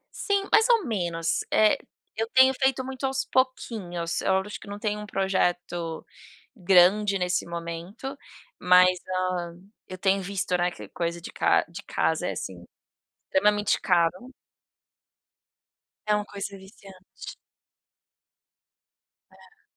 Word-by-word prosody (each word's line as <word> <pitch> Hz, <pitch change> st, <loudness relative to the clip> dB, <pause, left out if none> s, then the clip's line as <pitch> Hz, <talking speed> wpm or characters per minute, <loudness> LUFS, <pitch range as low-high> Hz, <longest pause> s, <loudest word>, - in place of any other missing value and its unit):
Sim, 400 Hz, -1 st, 0 dB
mais 445 Hz, +2 st, +5 dB
ou 460 Hz, -5 st, +4 dB
menos, 170 Hz, -7 st, -1 dB
eh, 215 Hz, -1 st, +5 dB, 0.4 s
eu 225 Hz, +1 st, -2 dB
tenho 260 Hz, 0 st, +7 dB
feito 265 Hz, 0 st, 0 dB
muito 265 Hz, 0 st, -8 dB
aos 265 Hz, 0 st, -1 dB
pouquinhos, 205 Hz, -10 st, -1 dB
eu 190 Hz, 0 st, +2 dB
acho 205 Hz, +2 st, -8 dB
que -, -, -14 dB
não 205 Hz, -, -6 dB
tenho 210 Hz, 0 st, -2 dB
um 210 Hz, -, -8 dB
projeto 175 Hz, -4 st, -1 dB, 0.5 s
grande 195 Hz, +1 st, +4 dB
nesse 180 Hz, -1 st, -1 dB
momento, 170 Hz, +10 st, -6 dB, 0.5 s
mas, 180 Hz, 0 st, +5 dB, 0.3 s
hã, 175 Hz, -1 st, -5 dB, 0.3 s
eu 185 Hz, -, -8 dB
tenho 195 Hz, +1 st, +1 dB
visto, 190 Hz, -1 st, -2 dB
né, 175 Hz, 0 st, +1 dB
que 175 Hz, -, -11 dB
coisa 170 Hz, 0 st, -3 dB
de 170 Hz, -, -9 dB
ca -, -, +2 dB
de 170 Hz, -, -9 dB
casa 160 Hz, -, -1 dB
é, -, -, -2 dB
assim, 90 Hz, -1 st, -7 dB, 0.6 s
extremamente 205 Hz, +1 st, +2 dB
caro. 180 Hz, +8 st, +1 dB, 1.7 s
É 210 Hz, -, +2 dB
uma 210 Hz, -, -2 dB
coisa 200 Hz, -1 st, -7 dB
viciante. 190 Hz, -1 st, -13 dB, 2.0 s
É. 420 Hz, -1 st, -22 dB
190 Hz, 125 wpm, -26 LUFS, 175-215 Hz, 2.0 s, tenho